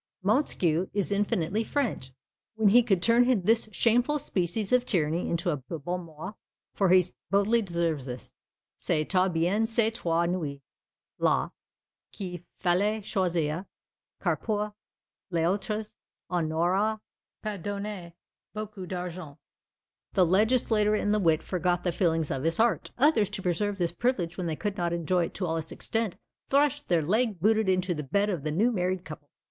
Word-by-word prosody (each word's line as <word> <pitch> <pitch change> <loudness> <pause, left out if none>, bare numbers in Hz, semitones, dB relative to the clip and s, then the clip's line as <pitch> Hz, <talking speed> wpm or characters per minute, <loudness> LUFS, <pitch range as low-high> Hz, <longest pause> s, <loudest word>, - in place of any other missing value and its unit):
Montesquieu 190 - +2
is 200 -1 0
infinitely 200 0 0
French, 225 - -2 0.4
when 220 -2 +4
he 240 +5 +7
could 195 -7 +1
turn 235 -2 +4
this 225 +2 +2
shameful 245 +7 +2
species 195 - -2
of 250 -1 +4
tyranny 170 -7 0
into 170 +1 0
a 150 - -1
bon 165 +6 -5
mot; 160 +5 -8 0.4
for 195 -2 +2
he 185 -1 +6 0.2
boldly 200 +5 +3
observes 170 - -1
on - - -3
this, 125 - -12 0.4
"C'étoit 185 +4 +1
bien 180 +7 +1
ces 225 -1 +2
trois 170 -7 0
nuits 160 -6 -2 0.6
là, - - +2 0.6
qu'il 180 -3 -6 0.2
falloit 200 +5 +1
choisir; 175 -3 -1 0.5
car - - +1
pour 210 -1 -2 0.6
les 165 -3 +1
autres 210 +4 -2 0.4
on 170 -3 0
n'auroit 190 +7 +1 0.4
pas 210 -2 -3
donné 200 -3 -5 0.4
beaucoup 210 -3 -6
d'argent." 180 -5 -6 0.8
The 185 -3 +4
legislator 215 +2 +3
in 205 -1 0
the 210 - +3
wit 165 -5 +2
forgot 180 -1 0
the 175 - +1
feelings 165 -3 0
of 135 - -2
his 165 +3 0
heart. 230 0 +2
Others, 245 -7 +4
to 200 -2 -6
preserve 200 +3 0
this 175 -3 0
privilege 180 -5 -1
when 180 -2 -3
they 160 - -1
could 205 +4 -3
not 170 -2 0
enjoy 170 +1 +1
it - - -9
in 185 - 0
all 165 -1 -1
its 160 0 -5
extent, 225 -4 -2 0.3
thrust 290 +1 +2
their 170 -3 +2
leg 215 +3 +1
booted 215 +2 +3
into 185 -1 +1
the 150 - -4
bed 200 +9 +1
of 175 -6 -2
the 155 - -3
new 205 +11 +2
married 185 -3 -1
couple. 150 -1 -10
185 Hz, 165 wpm, -28 LUFS, 170-215 Hz, 0.8 s, he